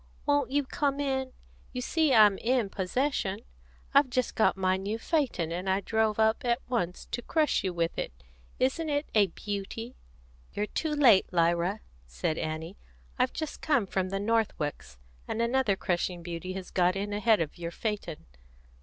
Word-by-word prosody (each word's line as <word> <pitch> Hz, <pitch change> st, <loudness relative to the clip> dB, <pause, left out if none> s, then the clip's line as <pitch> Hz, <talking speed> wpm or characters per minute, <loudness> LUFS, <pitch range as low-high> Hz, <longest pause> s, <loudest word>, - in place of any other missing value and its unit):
"Won't 290 Hz, -2 st, +2 dB
you 285 Hz, +2 st, +1 dB
come 280 Hz, +1 st, -1 dB
in? 265 Hz, -2 st, -1 dB, 0.4 s
You 250 Hz, -, -3 dB
see 315 Hz, +3 st, +2 dB
I'm 210 Hz, -5 st, +6 dB
in 240 Hz, -3 st, +1 dB
possession. 205 Hz, 0 st, -1 dB, 0.5 s
I've 280 Hz, -1 st, +5 dB
just 250 Hz, -1 st, 0 dB
got 220 Hz, -, +2 dB
my 185 Hz, 0 st, +2 dB
new 200 Hz, +3 st, -3 dB
phaeton, 230 Hz, -, 0 dB
and 180 Hz, +3 st, -3 dB
I 190 Hz, +1 st, +2 dB
drove 220 Hz, +1 st, 0 dB
up 220 Hz, 0 st, +2 dB
at 240 Hz, -1 st, +2 dB
once 180 Hz, -8 st, -2 dB
to 240 Hz, -, -2 dB
crush 310 Hz, +4 st, +1 dB
you 190 Hz, -, 0 dB
with 170 Hz, -1 st, -1 dB
it. -, -, -3 dB, 0.5 s
Isn't 290 Hz, +5 st, +1 dB
it 290 Hz, +1 st, 0 dB
a 210 Hz, -2 st, +5 dB
beauty?" 205 Hz, +6 st, -5 dB, 0.6 s
"You're 205 Hz, -, -1 dB
too 310 Hz, +8 st, -2 dB
late, 245 Hz, -10 st, +5 dB
Lyra," 175 Hz, +3 st, +1 dB, 0.3 s
said 60 Hz, -, -2 dB
Annie. 160 Hz, +4 st, -4 dB, 0.4 s
"I've 255 Hz, 0 st, +3 dB
just 315 Hz, -2 st, -5 dB
come 285 Hz, -9 st, +2 dB
from 185 Hz, -1 st, -1 dB
the 195 Hz, +1 st, -2 dB
Northwicks, 195 Hz, -, -1 dB, 0.3 s
and -, -, -3 dB
another 235 Hz, -3 st, +2 dB
crushing 175 Hz, -1 st, -2 dB
beauty 175 Hz, +2 st, -5 dB
has 190 Hz, -1 st, -7 dB
got 180 Hz, 0 st, +2 dB
in 205 Hz, +1 st, -3 dB
ahead 210 Hz, +1 st, +3 dB
of 165 Hz, +1 st, -3 dB
your 170 Hz, -1 st, -3 dB
phaeton." 200 Hz, -4 st, -4 dB
210 Hz, 170 wpm, -29 LUFS, 185-255 Hz, 0.6 s, I'm